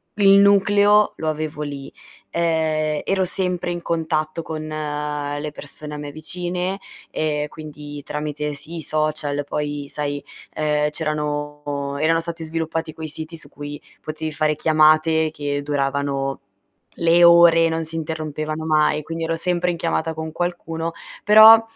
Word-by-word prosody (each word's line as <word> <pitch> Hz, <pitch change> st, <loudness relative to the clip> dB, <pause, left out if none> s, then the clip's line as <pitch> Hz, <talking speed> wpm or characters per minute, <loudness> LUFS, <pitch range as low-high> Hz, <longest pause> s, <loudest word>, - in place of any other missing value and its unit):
il 200 Hz, -1 st, +5 dB
nucleo 205 Hz, +1 st, +5 dB
lo 155 Hz, -, -1 dB
avevo 155 Hz, -1 st, -3 dB
lì. 140 Hz, -2 st, -6 dB, 0.4 s
Ehm, 155 Hz, -2 st, 0 dB
ero 195 Hz, -1 st, +1 dB
sempre 180 Hz, -1 st, -1 dB
in 175 Hz, 0 st, -4 dB
contatto 160 Hz, -1 st, -1 dB
con 155 Hz, -1 st, -5 dB
le 150 Hz, -1 st, -3 dB
persone 150 Hz, +1 st, -9 dB
a -, -, -5 dB
me 145 Hz, -1 st, -6 dB
vicine 180 Hz, +4 st, -4 dB, 0.3 s
e 150 Hz, -1 st, -1 dB
quindi 150 Hz, -2 st, -9 dB
tramite 150 Hz, 0 st, -3 dB
sì, 155 Hz, +4 st, -8 dB
i -, -, -4 dB
social, 155 Hz, -2 st, -1 dB
poi 145 Hz, -1 st, -3 dB
sai, 145 Hz, -1 st, -3 dB, 0.3 s
ehm, 150 Hz, -1 st, +1 dB
c'erano 150 Hz, -1 st, -3 dB, 0.3 s
erano 165 Hz, +2 st, +3 dB
stati 165 Hz, 0 st, -5 dB
sviluppati 160 Hz, 0 st, -3 dB
quei 160 Hz, 0 st, -6 dB
siti 160 Hz, +2 st, -5 dB
su -, -, -9 dB
cui 145 Hz, 0 st, -8 dB, 0.2 s
potevi 155 Hz, 0 st, -5 dB
fare 155 Hz, 0 st, +1 dB
chiamate 155 Hz, +1 st, +4 dB
che 145 Hz, -2 st, -3 dB
duravano 140 Hz, -1 st, -1 dB, 0.5 s
le 170 Hz, +1 st, +4 dB
ore, 170 Hz, -1 st, +7 dB
non 165 Hz, 0 st, -1 dB
si 160 Hz, +1 st, -8 dB
interrompevano 155 Hz, -1 st, -4 dB
mai, 155 Hz, -1 st, +2 dB
quindi 165 Hz, +2 st, -5 dB
ero 165 Hz, 0 st, 0 dB
sempre 180 Hz, +1 st, 0 dB
in 170 Hz, -, -4 dB
chiamata 165 Hz, -1 st, -1 dB
con 160 Hz, 0 st, -5 dB
qualcuno. 165 Hz, -1 st, -3 dB, 0.3 s
Però, 220 Hz, +2 st, +9 dB
155 Hz, 145 wpm, -22 LUFS, 150-165 Hz, 0.5 s, Però